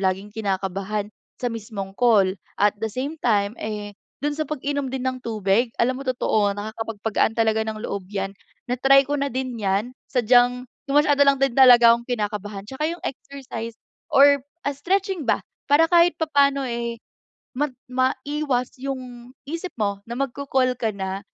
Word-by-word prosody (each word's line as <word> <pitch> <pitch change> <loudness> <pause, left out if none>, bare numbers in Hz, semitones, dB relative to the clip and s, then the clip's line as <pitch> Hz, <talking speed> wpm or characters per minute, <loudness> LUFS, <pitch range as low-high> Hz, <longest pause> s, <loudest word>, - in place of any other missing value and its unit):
laging 190 +2 -1
kinakabahan 200 0 -2 0.3
sa 245 - 0
mismong 210 -3 -6
call. 210 -6 +4 0.2
At 205 0 +3
the 225 - -1
same 280 +7 -4
time, 205 -3 +2
eh, 210 -1 -5 0.3
do'n 295 - +1
sa 310 - -1
pag-inom 285 -1 -2
din 260 -1 -4
ng 255 -1 -2
tubig, 215 +1 +1
alam 255 +2 +1
mo - - -4
totoo 215 -5 +1
na 210 +1 -4
nakakapagpagaan 225 0 -1
talaga 220 -1 +2
ng 215 0 -5
loob 195 -2 -4
'yan. 195 -1 -3 0.4
Na-try 270 +2 +5
ko 290 +1 -2
na 280 - 0
din 255 0 -2
'yan 205 +4 0 0.2
sadyang 245 +1 +3 0.2
masyado 290 0 +3
lang 275 - +5
din 270 -2 +1
talaga 240 -3 +8
akong 235 +1 -2
kinakabahan. 205 -3 -3
Tsaka 265 +7 -3
'yung 340 +1 -6
exercise 245 -4 -6 0.3
or 280 0 +6 0.3
stretching 365 - -1
ba, - - +2 0.3
para 295 +3 +6
kahit 340 -2 +5
papaano, 280 -4 +2
eh, 235 -1 -3 0.6
mag 295 -2 0 0.2
maiwas 260 0 0
'yung 255 -2 -6 0.2
isip 335 +3 -5
mo 200 -2 -1
na 235 - -5
magko-call 265 -2 0
ka 225 - 0
na, 190 0 -3
245 Hz, 155 wpm, -23 LUFS, 210-275 Hz, 0.6 s, talaga